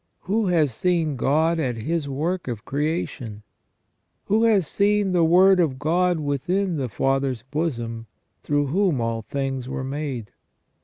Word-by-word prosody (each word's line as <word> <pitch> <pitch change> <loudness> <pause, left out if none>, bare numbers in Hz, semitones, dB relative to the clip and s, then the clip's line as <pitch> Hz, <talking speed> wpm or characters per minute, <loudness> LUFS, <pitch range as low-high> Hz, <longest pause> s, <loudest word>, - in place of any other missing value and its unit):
Who 210 +2 0
has 160 -7 +2
seen 165 +1 0
God 160 +6 +2
at 130 -6 -1
His 150 +5 -2
work 165 +6 -2
of 115 -4 -5
creation? 140 -7 -3 0.8
Who 220 +3 +2
has 210 -6 +3
seen 205 +3 +1
the 175 -2 +3
Word 185 +3 +5
of 150 -7 +1
God 170 +4 +1
within 160 +6 -1
the 130 -3 -2
Father's 135 0 0
bosom, 120 -6 -3 0.3
through 145 0 0
whom 170 0 +1
all 115 -1 -1
things 135 +1 -3
are 130 0 -4
made 135 -5 -4
150 Hz, 145 wpm, -23 LUFS, 130-180 Hz, 0.8 s, Word